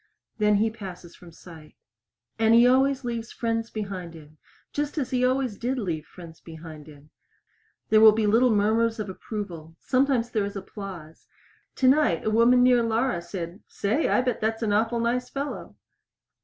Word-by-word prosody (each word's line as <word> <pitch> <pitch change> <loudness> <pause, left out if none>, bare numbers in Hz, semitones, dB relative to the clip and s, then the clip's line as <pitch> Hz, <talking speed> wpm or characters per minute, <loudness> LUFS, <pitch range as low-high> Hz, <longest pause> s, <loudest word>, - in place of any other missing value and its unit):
Then 210 0 +3
he 220 +2 +1
passes 185 -5 -10
from 175 -1 -15
sight. 160 -2 -14 0.6
And 225 0 +4
he 235 +1 +7
always 265 +1 +2
leaves 235 -1 -4
friends 230 -1 -2
behind 190 -5 -6
him 155 -1 -15 0.3
just 295 +1 -3
as 270 -5 -2
he 250 -1 +1
always 255 -4 0
did 255 +3 -2
leave 170 -9 -4
friends 170 -2 -13
behind 160 -2 -11
him. 150 0 -16 0.8
There 215 0 +5
will 220 -1 +9
be 215 0 0
little 230 +5 +4
murmurs 220 +2 +2
of 210 -2 -4
approval; 180 -5 -7
sometimes 255 -3 +1
there 215 -4 0
is 200 +1 -5
applause. 190 -5 -9 0.5
Tonight 260 - +2
a 215 - +1
woman 240 +3 +5
near 250 -1 +5
Laura 230 -3 0
said, 170 +2 -7
"Say, 220 +10 -1
I - - +3
bet 250 -2 -2
that's 225 +1 -1
an 210 -2 0
awful 225 +3 +1
nice 240 +2 -1
fellow." 280 +1 -6
220 Hz, 170 wpm, -25 LUFS, 180-245 Hz, 0.8 s, will